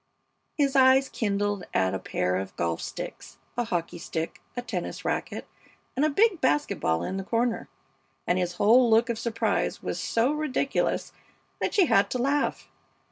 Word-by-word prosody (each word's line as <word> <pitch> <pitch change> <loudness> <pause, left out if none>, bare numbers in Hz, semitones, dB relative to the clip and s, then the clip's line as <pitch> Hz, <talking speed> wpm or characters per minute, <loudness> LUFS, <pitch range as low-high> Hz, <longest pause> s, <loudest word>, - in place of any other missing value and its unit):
His 280 -2 +2
eyes 265 0 +6
kindled 205 -2 -1
at 95 0 +2
a - - -2
pair 90 0 -1
of 95 0 -5
golf 85 -1 -1
sticks, - - -7 0.2
a 240 - 0
hockey 175 -4 -3
stick, 165 -1 -4 0.2
a 245 - -2
tennis 195 -8 -5
racket, - - -2 0.5
and 270 - +1
a 310 - +4
big 395 +4 +3
basket 145 +1 +1
ball 80 +1 +1
in 190 - -3
the 195 - -3
corner; 230 +3 -1 0.6
and 180 +1 +1
his 180 -1 -1
whole 235 +6 +5
look 230 +2 +4
of 225 - -4
surprise 230 -1 -1
was - - -3
so 235 +4 +1
ridiculous 300 -2 -1 0.5
that - - -1
she 395 -4 +6
had 200 -10 +3
to - - -1
laugh. 280 +4 0
230 Hz, 170 wpm, -27 LUFS, 175-260 Hz, 0.6 s, eyes